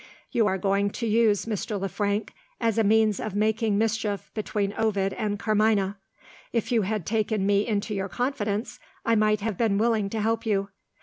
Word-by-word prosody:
You 225 Hz, -3 st, +3 dB
are 190 Hz, -1 st, +1 dB
going 200 Hz, +1 st, +1 dB
to 235 Hz, -, -4 dB
use 220 Hz, -2 st, +3 dB
Mr. 210 Hz, -1 st, -3 dB
Le 195 Hz, -, -1 dB
Frank 205 Hz, +2 st, -2 dB, 0.3 s
as 230 Hz, -1 st, +1 dB
a -, -, +4 dB
means 215 Hz, -1 st, +3 dB
of 215 Hz, -3 st, -4 dB
making 215 Hz, 0 st, +1 dB
mischief 220 Hz, -2 st, -1 dB
between 205 Hz, -2 st, -2 dB
Ovid 200 Hz, -3 st, 0 dB
and 205 Hz, -1 st, -2 dB
Carmina. 210 Hz, -2 st, +1 dB, 0.5 s
If 230 Hz, +1 st, -1 dB
you 235 Hz, -2 st, +3 dB
had 205 Hz, -2 st, -2 dB
taken 215 Hz, -2 st, 0 dB
me 205 Hz, +1 st, +2 dB
into 210 Hz, -1 st, -1 dB
your 195 Hz, -1 st, -2 dB
confidence, 220 Hz, +1 st, -2 dB, 0.3 s
I 230 Hz, -, +3 dB
might 215 Hz, -1 st, +3 dB
have 210 Hz, -3 st, -3 dB
been 220 Hz, -4 st, +2 dB
willing 220 Hz, -2 st, +1 dB
to 220 Hz, -, -3 dB
help 225 Hz, +1 st, 0 dB
you. 200 Hz, -3 st, 0 dB
215 Hz, 185 wpm, -26 LUFS, 200-225 Hz, 0.5 s, a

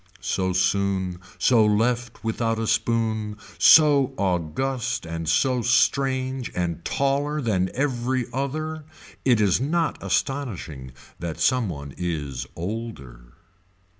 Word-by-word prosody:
So 95 Hz, +2 st, -1 dB
soon, 95 Hz, 0 st, 0 dB, 0.2 s
so 120 Hz, -4 st, +4 dB
left 115 Hz, +3 st, 0 dB
without 115 Hz, 0 st, -1 dB
a 115 Hz, -, -1 dB
spoon, 110 Hz, -2 st, 0 dB, 0.2 s
so 140 Hz, -4 st, +6 dB
august 95 Hz, -, -1 dB
and 80 Hz, -1 st, -4 dB
so 125 Hz, +8 st, +2 dB
strange 130 Hz, +2 st, +1 dB
and 85 Hz, -2 st, -2 dB
taller 140 Hz, -, 0 dB
than 95 Hz, -8 st, 0 dB
every 130 Hz, -2 st, 0 dB
other, 155 Hz, +4 st, -3 dB, 0.4 s
it 125 Hz, -4 st, +4 dB
is 100 Hz, +1 st, +3 dB
not 160 Hz, +4 st, 0 dB
astonishing 90 Hz, -, -3 dB, 0.3 s
that 85 Hz, -2 st, -5 dB
some 125 Hz, -5 st, +2 dB
one 70 Hz, -4 st, -7 dB
is 75 Hz, -7 st, -3 dB
older. 80 Hz, -, -7 dB
115 Hz, 110 wpm, -24 LUFS, 90-130 Hz, 0.4 s, so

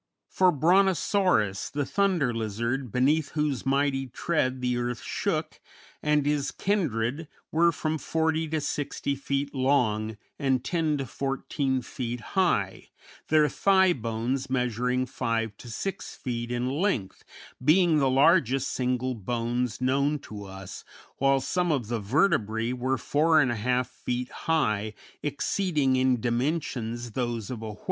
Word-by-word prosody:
For 185 Hz, -1 st, +4 dB
Brontosaurus, 180 Hz, -, +2 dB
the 145 Hz, +1 st, -2 dB
Thunder 180 Hz, -9 st, +1 dB
Lizard, 115 Hz, +3 st, -2 dB
beneath 140 Hz, +5 st, +2 dB
whose 150 Hz, -4 st, -1 dB
mighty 135 Hz, -1 st, +1 dB
tread 130 Hz, 0 st, -1 dB
the 125 Hz, -1 st, 0 dB
earth 120 Hz, 0 st, -3 dB
shook, -, -, -2 dB, 0.4 s
and 150 Hz, -1 st, +2 dB
his 145 Hz, -1 st, +1 dB
kindred 155 Hz, -, -1 dB, 0.2 s
were 170 Hz, +2 st, +4 dB
from 155 Hz, -1 st, -2 dB
40 160 Hz, +1 st, 0 dB
to 155 Hz, 0 st, -1 dB
60 140 Hz, -1 st, -2 dB
feet 140 Hz, +1 st, -2 dB
long 110 Hz, -6 st, +1 dB, 0.2 s
and 135 Hz, -3 st, +1 dB
10 160 Hz, -3 st, 0 dB
to 135 Hz, -, -3 dB
14 135 Hz, 0 st, -2 dB
feet 120 Hz, 0 st, -4 dB
high, 170 Hz, -, +1 dB, 0.4 s
their 155 Hz, -1 st, +4 dB
thigh 190 Hz, +4 st, +4 dB
bones 120 Hz, +2 st, -2 dB
measuring 125 Hz, 0 st, 0 dB
5 115 Hz, -3 st, -2 dB
to 120 Hz, -, -11 dB
6 195 Hz, -, -5 dB
feet 120 Hz, -2 st, -4 dB
in 120 Hz, +1 st, -1 dB
length, 140 Hz, -, -1 dB, 0.4 s
being 160 Hz, +2 st, +5 dB
the 135 Hz, -2 st, +3 dB
largest 135 Hz, -1 st, +3 dB
single 125 Hz, 0 st, -1 dB
bones 120 Hz, +2 st, -2 dB
known 140 Hz, +3 st, +2 dB
to 105 Hz, -7 st, -9 dB
us, 95 Hz, -1 st, -9 dB, 0.3 s
while 135 Hz, 0 st, +3 dB
some 175 Hz, +5 st, 0 dB
of 125 Hz, -8 st, -1 dB
the 120 Hz, -2 st, -1 dB
vertebræ 115 Hz, -, +1 dB
were 130 Hz, +1 st, -1 dB
4 160 Hz, +3 st, +2 dB
1/2 125 Hz, -1 st, +1 dB
feet 125 Hz, +1 st, -4 dB
high, 110 Hz, -10 st, 0 dB, 0.3 s
exceeding 145 Hz, -1 st, 0 dB
in 130 Hz, -1 st, +2 dB
dimensions 120 Hz, -2 st, -2 dB
those 120 Hz, -2 st, -3 dB
of 120 Hz, -3 st, -5 dB
a 110 Hz, -1 st, -5 dB
whale. 105 Hz, -, -16 dB
130 Hz, 135 wpm, -27 LUFS, 120-150 Hz, 0.4 s, being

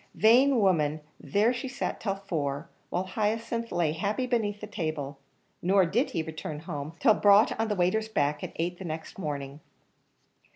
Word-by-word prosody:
Vain 250 Hz, +4 st, +5 dB
woman, 155 Hz, -7 st, +2 dB, 0.2 s
there 205 Hz, -, +2 dB
she 260 Hz, +2 st, -4 dB
sat 265 Hz, -, -3 dB
till 195 Hz, -3 st, -1 dB
four, 160 Hz, -6 st, -3 dB, 0.2 s
while 180 Hz, -, -1 dB
Hyacinth 230 Hz, +4 st, -2 dB
lay 170 Hz, -3 st, +1 dB
happy 205 Hz, +10 st, -1 dB
beneath 220 Hz, -5 st, 0 dB
the 210 Hz, -, -6 dB
table; 155 Hz, -8 st, -4 dB, 0.4 s
nor 190 Hz, +1 st, +4 dB
did 220 Hz, -, +1 dB
he 165 Hz, -, -2 dB
return 155 Hz, -1 st, -6 dB
home, 155 Hz, -2 st, -5 dB
till 220 Hz, -, +6 dB
brought 205 Hz, +1 st, +5 dB
on 225 Hz, -, +1 dB
the 210 Hz, -, 0 dB
waiter's 200 Hz, +5 st, +1 dB
back, 150 Hz, -6 st, 0 dB
at -, -, -4 dB
eight 175 Hz, +2 st, -2 dB
the -, -, -6 dB
next 160 Hz, +1 st, -6 dB
morning. 145 Hz, -4 st, -4 dB
185 Hz, 170 wpm, -28 LUFS, 155-220 Hz, 0.4 s, till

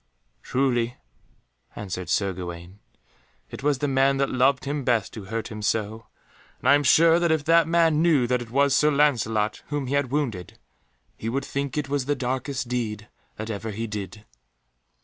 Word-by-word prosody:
"Truly," 125 Hz, -, 0 dB, 0.8 s
answered 90 Hz, -4 st, -5 dB
Sir 100 Hz, +1 st, +1 dB
Gawaine, 90 Hz, +1 st, -8 dB, 0.7 s
"it -, -, -8 dB
was 145 Hz, 0 st, +1 dB
the 145 Hz, -, -1 dB
man 135 Hz, 0 st, +2 dB
that 140 Hz, 0 st, 0 dB
loved 135 Hz, +2 st, +2 dB
him 145 Hz, 0 st, -2 dB
best 120 Hz, -6 st, 0 dB
who 105 Hz, -4 st, -8 dB
hurt 115 Hz, +3 st, -4 dB
him 110 Hz, -2 st, -7 dB
so, 110 Hz, +1 st, -2 dB, 0.5 s
and -, -, -4 dB
I -, -, +7 dB
am 145 Hz, -, +4 dB
sure 165 Hz, +4 st, +5 dB
that 170 Hz, -1 st, +1 dB
if 160 Hz, -2 st, +1 dB
that 165 Hz, +1 st, +4 dB
man 165 Hz, -2 st, +3 dB
knew 160 Hz, -7 st, +3 dB
that 125 Hz, 0 st, 0 dB
it 120 Hz, -, -8 dB
was 140 Hz, +2 st, +3 dB
Sir 150 Hz, -, +4 dB
Lancelot 115 Hz, -8 st, +1 dB
whom 145 Hz, -1 st, -3 dB
he 130 Hz, -, -3 dB
had 140 Hz, -2 st, +1 dB
wounded, 120 Hz, -, -3 dB, 0.6 s
he 115 Hz, -, -4 dB
would 135 Hz, +3 st, -2 dB
think 140 Hz, +2 st, -3 dB
it 150 Hz, -2 st, -1 dB
was 140 Hz, -1 st, -1 dB
the 145 Hz, +1 st, 0 dB
darkest 130 Hz, 0 st, -3 dB
deed 110 Hz, -4 st, -3 dB, 0.3 s
that 110 Hz, +1 st, -5 dB
ever 110 Hz, +1 st, -5 dB
he 110 Hz, +2 st, -4 dB
did." 105 Hz, 0 st, -7 dB
125 Hz, 185 wpm, -25 LUFS, 110-145 Hz, 0.8 s, I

